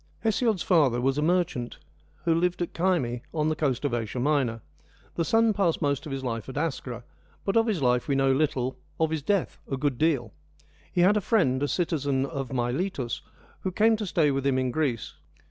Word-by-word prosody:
Hesiod's 220 Hz, -2 st, +1 dB
father 145 Hz, -9 st, +3 dB
was 135 Hz, +3 st, +1 dB
a -, -, +1 dB
merchant 165 Hz, -7 st, 0 dB, 0.5 s
who 165 Hz, -, +3 dB
lived 180 Hz, +2 st, +1 dB
at 170 Hz, -, -6 dB
Kyme, 165 Hz, -10 st, 0 dB
on 155 Hz, 0 st, +1 dB
the 155 Hz, -, 0 dB
coast 145 Hz, -3 st, -1 dB
of 140 Hz, -, 0 dB
Asia 115 Hz, +1 st, -2 dB
Minor. 130 Hz, -5 st, +1 dB, 0.5 s
The 170 Hz, -, 0 dB
son 225 Hz, +5 st, +3 dB
passed 190 Hz, -5 st, +1 dB
I -, -, 0 dB
most 140 Hz, +2 st, -1 dB
of -, -, -6 dB
his 135 Hz, -1 st, -4 dB
life 115 Hz, -1 st, -3 dB
at 130 Hz, -, -7 dB
Askra, 135 Hz, -6 st, -3 dB, 0.4 s
but 195 Hz, -, 0 dB
of 225 Hz, 0 st, +4 dB
his 190 Hz, -10 st, 0 dB
life 125 Hz, -1 st, +2 dB
we 140 Hz, -, +1 dB
know 135 Hz, 0 st, +3 dB
little, 130 Hz, -2 st, 0 dB, 0.2 s
of 160 Hz, -1 st, +2 dB
his 160 Hz, -2 st, -1 dB
death 200 Hz, +4 st, 0 dB
a 135 Hz, -, 0 dB
good 135 Hz, -2 st, -1 dB
deal. 140 Hz, -9 st, +1 dB, 0.6 s
He 175 Hz, -, +1 dB
had 200 Hz, +4 st, +5 dB
a -, -, +1 dB
friend, 165 Hz, -, +2 dB
a 145 Hz, -, +1 dB
citizen 145 Hz, -6 st, 0 dB
of 140 Hz, -3 st, -5 dB
Miletus, 125 Hz, +1 st, -2 dB, 0.4 s
who 190 Hz, -, -3 dB
came 220 Hz, +4 st, +4 dB
to 210 Hz, -2 st, -4 dB
stay 155 Hz, -4 st, +2 dB
with 135 Hz, 0 st, -1 dB
him 135 Hz, -1 st, +2 dB
in 130 Hz, -1 st, 0 dB
Greece. 130 Hz, -6 st, -1 dB
145 Hz, 210 wpm, -27 LUFS, 130-175 Hz, 0.6 s, had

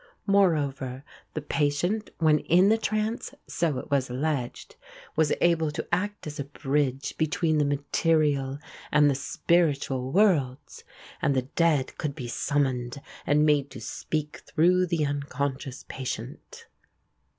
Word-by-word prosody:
Moreover, 145 Hz, -10 st, +1 dB, 0.3 s
the 155 Hz, -, -3 dB
patient 155 Hz, +9 st, 0 dB
when 155 Hz, -2 st, +4 dB
in 180 Hz, +6 st, +4 dB
the 220 Hz, -, +4 dB
trance, 220 Hz, +5 st, -2 dB
so 165 Hz, -6 st, -1 dB
it -, -, -7 dB
was 135 Hz, -2 st, +1 dB
alleged, 130 Hz, -1 st, -3 dB, 0.4 s
was 155 Hz, -2 st, +2 dB
able 165 Hz, -2 st, +3 dB
to 150 Hz, -, -5 dB
act 205 Hz, +4 st, -1 dB
as 150 Hz, -1 st, -6 dB
a 140 Hz, -, -2 dB
bridge 140 Hz, -1 st, -1 dB
between 160 Hz, 0 st, +1 dB
the 145 Hz, -, +3 dB
material 145 Hz, -1 st, +1 dB, 0.3 s
and 145 Hz, -1 st, +5 dB
the -, -, +2 dB
spiritual 140 Hz, -2 st, 0 dB
worlds, 160 Hz, -10 st, +1 dB, 0.4 s
and 140 Hz, 0 st, +2 dB
the 130 Hz, -, +1 dB
dead 160 Hz, -6 st, +2 dB
could 150 Hz, -4 st, -2 dB
be 125 Hz, -5 st, -6 dB
summoned 130 Hz, -1 st, -1 dB, 0.3 s
and 150 Hz, +1 st, +4 dB
made 145 Hz, -2 st, +3 dB
to -, -, -9 dB
speak 150 Hz, -1 st, -4 dB
through 180 Hz, +3 st, +3 dB
the 165 Hz, -3 st, +1 dB
unconscious 140 Hz, -1 st, -3 dB
patient. 130 Hz, -1 st, -6 dB
145 Hz, 135 wpm, -27 LUFS, 135-165 Hz, 0.4 s, and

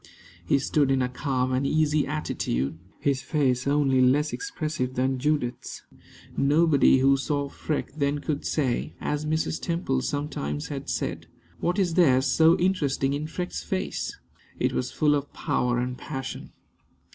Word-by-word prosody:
He 90 Hz, -, +2 dB
stood 140 Hz, +1 st, +1 dB
in 135 Hz, -1 st, +2 dB
a 125 Hz, -, -1 dB
calm 130 Hz, -1 st, -1 dB
and 130 Hz, +1 st, +1 dB
easy 155 Hz, -1 st, +2 dB
attitude, 80 Hz, -, -2 dB, 0.2 s
his 140 Hz, -2 st, 0 dB
face 135 Hz, -5 st, 0 dB
only 140 Hz, -2 st, +3 dB
less 140 Hz, +4 st, +3 dB
expressive 155 Hz, -, -3 dB
than 130 Hz, +1 st, 0 dB
Judith's. 145 Hz, -3 st, -2 dB, 0.5 s
Nobody 145 Hz, -1 st, +4 dB
who 135 Hz, +1 st, +5 dB
saw 140 Hz, +1 st, -1 dB
Freke 150 Hz, +1 st, -3 dB
then 145 Hz, -1 st, 0 dB
could 145 Hz, 0 st, -3 dB
say, 135 Hz, -6 st, -1 dB
as 150 Hz, +1 st, -2 dB
Mrs. 160 Hz, 0 st, -1 dB
Temple 165 Hz, -7 st, -1 dB
sometimes 130 Hz, -, -3 dB
had -, -, -5 dB
said, -, -, -3 dB, 0.3 s
"What 175 Hz, +3 st, 0 dB
is 185 Hz, -4 st, +1 dB
there 150 Hz, -8 st, +5 dB
so 160 Hz, +6 st, +4 dB
interesting 145 Hz, -7 st, +1 dB
in 150 Hz, +2 st, -3 dB
Freke's 180 Hz, +2 st, -4 dB
face?" 190 Hz, -1 st, -3 dB, 0.4 s
It -, -, +1 dB
was 125 Hz, -, -2 dB
full 150 Hz, -1 st, +2 dB
of 145 Hz, -1 st, -2 dB
power 125 Hz, 0 st, 0 dB
and 125 Hz, +1 st, -2 dB
passion. 135 Hz, 0 st, -6 dB
140 Hz, 150 wpm, -26 LUFS, 130-155 Hz, 0.5 s, who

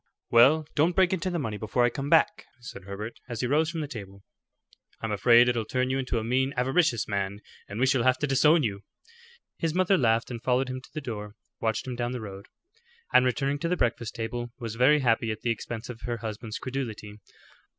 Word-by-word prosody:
"Well, 140 Hz, +7 st, +6 dB
don't 165 Hz, +4 st, +2 dB
break 190 Hz, -1 st, +4 dB
into 185 Hz, 0 st, -1 dB
the 175 Hz, -, -2 dB
money 110 Hz, -9 st, -3 dB
before 110 Hz, +4 st, 0 dB
I 120 Hz, -, +1 dB
come 135 Hz, +3 st, -4 dB
back," 210 Hz, +7 st, +3 dB
said 110 Hz, -5 st, -10 dB
Herbert 105 Hz, +3 st, -7 dB
as 120 Hz, -2 st, -4 dB
he -, -, 0 dB
rose 155 Hz, +5 st, +2 dB
from 165 Hz, -2 st, -3 dB
the 150 Hz, -, -3 dB
table. 100 Hz, -6 st, -9 dB, 0.8 s
"I'm 110 Hz, -, -3 dB
afraid 115 Hz, +4 st, +5 dB
it'll 120 Hz, -2 st, +1 dB
turn 130 Hz, +3 st, -1 dB
you 135 Hz, -, 0 dB
into 130 Hz, -2 st, -2 dB
a 110 Hz, -, -1 dB
mean, 130 Hz, +4 st, 0 dB
avaricious 125 Hz, -, +2 dB
man, 100 Hz, 0 st, -2 dB, 0.3 s
and 100 Hz, +3 st, -6 dB
we 130 Hz, -, +4 dB
shall 130 Hz, -1 st, +2 dB
have 130 Hz, +1 st, +3 dB
to 150 Hz, -, -1 dB
disown 150 Hz, +3 st, +4 dB
you." 100 Hz, -4 st, -2 dB, 0.8 s
His 165 Hz, 0 st, -1 dB
mother 185 Hz, 0 st, +3 dB
laughed, 115 Hz, -1 st, +2 dB
and 115 Hz, -2 st, -6 dB
following 130 Hz, +1 st, +1 dB
him 130 Hz, 0 st, -5 dB
to -, -, -16 dB
the 155 Hz, -, -3 dB
door, 105 Hz, -5 st, -6 dB, 0.2 s
watched 110 Hz, -2 st, -1 dB
him 130 Hz, -1 st, -4 dB
down 120 Hz, 0 st, -2 dB
the 125 Hz, -, -4 dB
road; 100 Hz, -2 st, -9 dB, 0.7 s
and 125 Hz, -, +6 dB
returning 135 Hz, +3 st, 0 dB
to 170 Hz, -, -2 dB
the 180 Hz, -, 0 dB
breakfast 120 Hz, -3 st, -1 dB
table, 120 Hz, +1 st, -4 dB
was 115 Hz, -3 st, -5 dB
very 135 Hz, +6 st, +4 dB
happy 115 Hz, -2 st, +2 dB
at 110 Hz, -1 st, -4 dB
the 120 Hz, -, 0 dB
expense 115 Hz, +1 st, -5 dB
of 120 Hz, -2 st, -9 dB
her 120 Hz, -1 st, -3 dB
husband's 110 Hz, 0 st, -6 dB
credulity. 115 Hz, -5 st, -5 dB
125 Hz, 220 wpm, -27 LUFS, 110-135 Hz, 0.8 s, Well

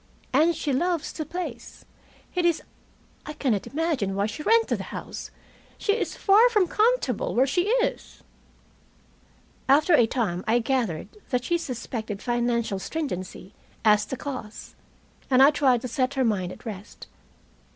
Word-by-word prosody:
"And 320 Hz, +5 st, +4 dB
she 285 Hz, -, -2 dB
loves 340 Hz, +3 st, 0 dB
the 310 Hz, -, -5 dB
place. 310 Hz, -10 st, -7 dB, 0.5 s
It 360 Hz, -, 0 dB
is 340 Hz, -2 st, +2 dB, 0.6 s
I 300 Hz, -, -5 dB
cannot 245 Hz, -9 st, -1 dB
imagine 285 Hz, -, -1 dB
why 200 Hz, +1 st, +1 dB
she 220 Hz, +7 st, -5 dB
rented 455 Hz, +7 st, +3 dB
the -, -, -5 dB
house. -, -, -7 dB, 0.5 s
She 410 Hz, -, +1 dB
is 455 Hz, -, -2 dB
far 435 Hz, +5 st, +5 dB
from 420 Hz, -6 st, +2 dB
comfortable 470 Hz, +7 st, +1 dB
where 255 Hz, -, +4 dB
she 355 Hz, +7 st, 0 dB
is." 485 Hz, +2 st, -1 dB, 1.5 s
After 300 Hz, +5 st, +5 dB
a 240 Hz, -7 st, +6 dB
time 200 Hz, -8 st, -1 dB
I 225 Hz, +2 st, +4 dB
gathered 230 Hz, -9 st, -1 dB, 0.2 s
that 250 Hz, -1 st, 0 dB
she 345 Hz, +5 st, 0 dB
suspected 230 Hz, -7 st, -5 dB
financial 235 Hz, -4 st, -1 dB
stringency 190 Hz, -, -5 dB, 0.3 s
as 210 Hz, -1 st, +5 dB
the 265 Hz, -, -5 dB
cause, 255 Hz, -7 st, -7 dB, 0.6 s
and 260 Hz, 0 st, +6 dB
I 285 Hz, -, +7 dB
tried 270 Hz, -5 st, +2 dB
to 255 Hz, -, -4 dB
set 260 Hz, +2 st, -1 dB
her 265 Hz, -1 st, +2 dB
mind 190 Hz, -5 st, 0 dB
at -, -, -12 dB
rest. 210 Hz, -2 st, -8 dB
260 Hz, 150 wpm, -25 LUFS, 220-330 Hz, 1.5 s, I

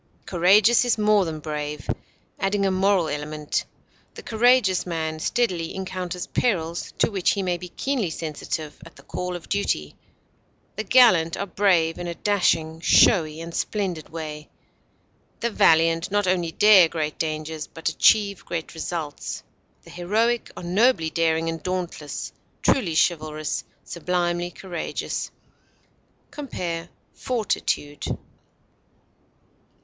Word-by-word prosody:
Courageous 200 Hz, +7 st, +5 dB
is 245 Hz, -2 st, +1 dB
more 210 Hz, -2 st, +3 dB
than 160 Hz, -2 st, -4 dB
brave, 150 Hz, -1 st, -5 dB, 0.5 s
adding 195 Hz, +1 st, +1 dB
a 195 Hz, -, +2 dB
moral 190 Hz, -2 st, +2 dB
element: 150 Hz, 0 st, -3 dB, 0.5 s
the -, -, -9 dB
courageous 230 Hz, -4 st, +3 dB
man 160 Hz, -2 st, -3 dB
steadily 180 Hz, -4 st, -1 dB
encounters 185 Hz, -2 st, -4 dB
perils 170 Hz, -8 st, -1 dB
to -, -, +2 dB
which 190 Hz, -3 st, +1 dB
he 200 Hz, -, -2 dB
may 180 Hz, -1 st, 0 dB
be 180 Hz, +1 st, -8 dB
keenly 255 Hz, -3 st, -1 dB
sensitive, 155 Hz, -1 st, -5 dB
at 165 Hz, -, -14 dB
the -, -, -16 dB
call 180 Hz, 0 st, -4 dB
of 175 Hz, -, -9 dB
duty; 75 Hz, -, -1 dB, 0.8 s
the 215 Hz, -, -3 dB
gallant 190 Hz, -8 st, +5 dB
are 200 Hz, -, -2 dB
brave 180 Hz, -4 st, +2 dB
in 175 Hz, -, -4 dB
a 170 Hz, -, -4 dB
dashing, 170 Hz, -6 st, +1 dB
showy, 160 Hz, -5 st, +4 dB
and 165 Hz, 0 st, -7 dB
splendid 185 Hz, -7 st, -2 dB
way; 155 Hz, -2 st, -7 dB, 0.9 s
the 235 Hz, -, -1 dB
valiant 165 Hz, -1 st, +3 dB
not 205 Hz, 0 st, +1 dB
only 180 Hz, -3 st, 0 dB
dare 195 Hz, -3 st, +7 dB
great 155 Hz, -2 st, -3 dB
dangers, 155 Hz, 0 st, -3 dB
but 165 Hz, -, -7 dB
achieve 200 Hz, +4 st, +3 dB
great 165 Hz, -1 st, -5 dB
results; 160 Hz, -2 st, -5 dB, 0.4 s
the -, -, -14 dB
heroic 220 Hz, +7 st, 0 dB
are -, -, -7 dB
nobly 180 Hz, -2 st, +2 dB
daring 165 Hz, 0 st, +1 dB
and 165 Hz, -1 st, -3 dB
dauntless, 180 Hz, -5 st, -4 dB, 0.3 s
truly 180 Hz, -12 st, +2 dB
chivalrous, 155 Hz, -3 st, 0 dB, 0.2 s
sublimely 175 Hz, 0 st, -1 dB
courageous. 175 Hz, -1 st, -4 dB, 1.0 s
Compare 175 Hz, -, -5 dB, 0.2 s
FORTITUDE. 175 Hz, -, -2 dB
175 Hz, 125 wpm, -24 LUFS, 160-200 Hz, 1.0 s, dare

